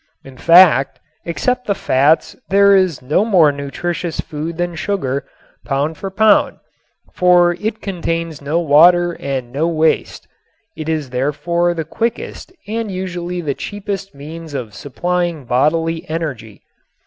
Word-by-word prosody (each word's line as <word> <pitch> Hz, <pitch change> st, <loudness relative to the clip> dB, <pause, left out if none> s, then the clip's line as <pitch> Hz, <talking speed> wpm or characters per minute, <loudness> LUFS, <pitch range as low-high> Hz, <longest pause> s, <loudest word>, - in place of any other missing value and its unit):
In 135 Hz, -1 st, -13 dB
fact, 165 Hz, -3 st, +5 dB, 0.3 s
except 250 Hz, +9 st, -1 dB
the 200 Hz, -, +1 dB
fats 145 Hz, +2 st, +2 dB
there 200 Hz, 0 st, +5 dB
is 185 Hz, -8 st, +1 dB
no 150 Hz, +9 st, +2 dB
more 180 Hz, -9 st, +4 dB
nutritious 160 Hz, +5 st, -4 dB
food 160 Hz, +2 st, -5 dB
than 175 Hz, 0 st, -2 dB
sugar, 160 Hz, -7 st, -2 dB, 0.4 s
pound 145 Hz, +3 st, -1 dB
for 195 Hz, -, -6 dB
pound, 210 Hz, +1 st, +3 dB, 0.6 s
for 175 Hz, -1 st, +4 dB
it 215 Hz, +5 st, -4 dB
contains 165 Hz, -5 st, -3 dB
no 150 Hz, +4 st, 0 dB
water 175 Hz, +3 st, +5 dB
and 130 Hz, -3 st, -4 dB
no 150 Hz, +5 st, 0 dB
waste. 160 Hz, -1 st, 0 dB, 0.5 s
It 155 Hz, 0 st, -5 dB
is 155 Hz, -5 st, -2 dB
therefore 170 Hz, +7 st, 0 dB
the 160 Hz, -2 st, -3 dB
quickest 230 Hz, -, -4 dB, 0.2 s
and 225 Hz, 0 st, -3 dB
usually 180 Hz, -2 st, -4 dB
the 145 Hz, -4 st, -2 dB
cheapest 200 Hz, +2 st, -6 dB
means 155 Hz, +2 st, -9 dB
of 120 Hz, -6 st, -5 dB
supplying 175 Hz, +2 st, -3 dB
bodily 160 Hz, +7 st, 0 dB
energy. 135 Hz, -, -5 dB
165 Hz, 135 wpm, -17 LUFS, 145-180 Hz, 0.6 s, fact